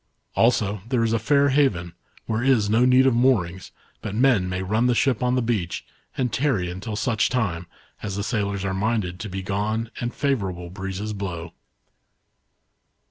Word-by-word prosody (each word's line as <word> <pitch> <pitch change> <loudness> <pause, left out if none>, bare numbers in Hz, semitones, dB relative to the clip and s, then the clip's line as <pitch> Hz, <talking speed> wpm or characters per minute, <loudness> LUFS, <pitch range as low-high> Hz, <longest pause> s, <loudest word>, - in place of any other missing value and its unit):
Also 105 -4 +2
there 125 -3 +2
is 115 0 +1
a 115 - +2
fair 140 +5 +3
haven, 120 - +1 0.3
where 110 +1 -1
is 120 -6 +3
no 115 +3 +4
need 130 +1 +5
of 135 - +4
moorings, 105 -8 +1 0.3
but 105 -2 -5
men 115 -7 +3
may 90 +1 -2
run 110 +6 +1
the 125 - +2
ship 130 -1 +2
on 125 0 +2
the 125 - +1
beach, 105 -7 -2 0.3
and 125 -5 -1
tarry 110 -11 0
until 100 +4 -5
such 110 -1 +1
time, 90 -9 -1 0.3
as 100 -2 -4
the 100 - -2
sailors 100 -3 -1
are 95 - -1
minded 95 -3 -1
to 110 - -5
be 95 0 -5
gone 110 +4 -2
and 120 0 -3
favourable 95 -11 -2
breezes 95 +2 -4
blow." 85 -4 -5
110 Hz, 175 wpm, -24 LUFS, 95-125 Hz, 0.3 s, need